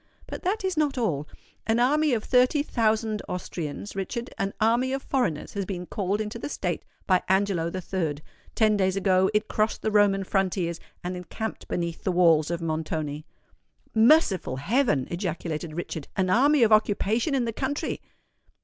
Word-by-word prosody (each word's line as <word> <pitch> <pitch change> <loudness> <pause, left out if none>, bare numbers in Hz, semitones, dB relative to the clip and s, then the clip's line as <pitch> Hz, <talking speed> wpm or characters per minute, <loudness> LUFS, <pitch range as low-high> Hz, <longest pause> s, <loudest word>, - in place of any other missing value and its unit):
But - - -7
that 395 +3 -1
is 375 -3 -1
not 295 -3 +1
all. 155 - -1 0.4
An 225 +1 +2
army 295 +5 +3
of 220 - -3
thirty 255 +3 +3
thousand 220 -4 0
Austrians, 180 +1 -5
Richard,—an 195 0 -3
army 240 +4 +2
of 270 - -3
foreigners 245 - -1
has 200 - -2
been 180 -2 -5
called 200 +2 -2
into 215 +2 -4
the - - -5
State - - -3 0.2
by 185 -2 +3
Angelo 190 -3 +2
III. 180 -3 -2 0.4
Ten 215 -2 +4
days 190 -1 +1
ago 190 -1 +3
it 215 +1 +2
crossed 215 +1 -1
the 220 - 0
Roman 205 -2 +4
frontiers, 185 -3 -1 0.2
and 180 +1 -3
encamped 215 +5 -6
beneath 170 -1 -3
the 190 - +1
walls 165 -4 +4
of 170 0 -3
Montoni." 155 -2 -3 0.7
"Merciful 220 - +4
heaven!" 180 - +1
ejaculated 170 -3 -3
Richard: 160 -3 -5
"an 185 -1 +1
army 280 +5 +5
of 225 - +4
occupation 215 - +2
in 255 -3 +1
the 230 - -2
country!" 285 +5 -3
200 Hz, 160 wpm, -26 LUFS, 175-235 Hz, 0.7 s, army